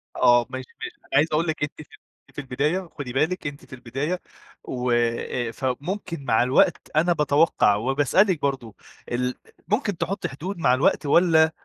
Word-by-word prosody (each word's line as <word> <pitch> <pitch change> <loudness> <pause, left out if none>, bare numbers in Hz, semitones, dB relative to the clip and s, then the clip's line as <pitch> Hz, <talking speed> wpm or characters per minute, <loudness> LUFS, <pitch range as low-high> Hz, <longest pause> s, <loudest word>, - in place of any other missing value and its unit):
آه 120 -1 +5
ماشي، 130 -1 -6
ماشي، - - -6
أنا - - -27
عايز 155 +3 +5
أقول 160 +3 +1
لِك 155 -2 -2
أنتِ 145 +1 -4
في - - -14 0.4
في - - -5
البداية، 150 +7 -1
خدي 125 -4 -5
بالك 155 +5 0
أنتِ 145 0 -8
في - - -14
البداية، 135 +8 -3 0.4
و 125 -1 -2 0.6
فممكن 145 - -4
مع 110 0 +3
الوقت 130 +2 +2
أنا 170 +3 +4
باتوقع 150 -8 +3
وباسألِك 145 - +2
برضو، 125 -7 -2 0.4
ال 125 +1 -1 0.3
ممكن 205 -3 0
تحطّي 195 +4 -2
حدود 175 +9 -6
مع 125 -7 +3
الوقت 135 +3 +2
والّا، 160 0 +4
145 Hz, 160 wpm, -24 LUFS, 130-170 Hz, 0.6 s, آه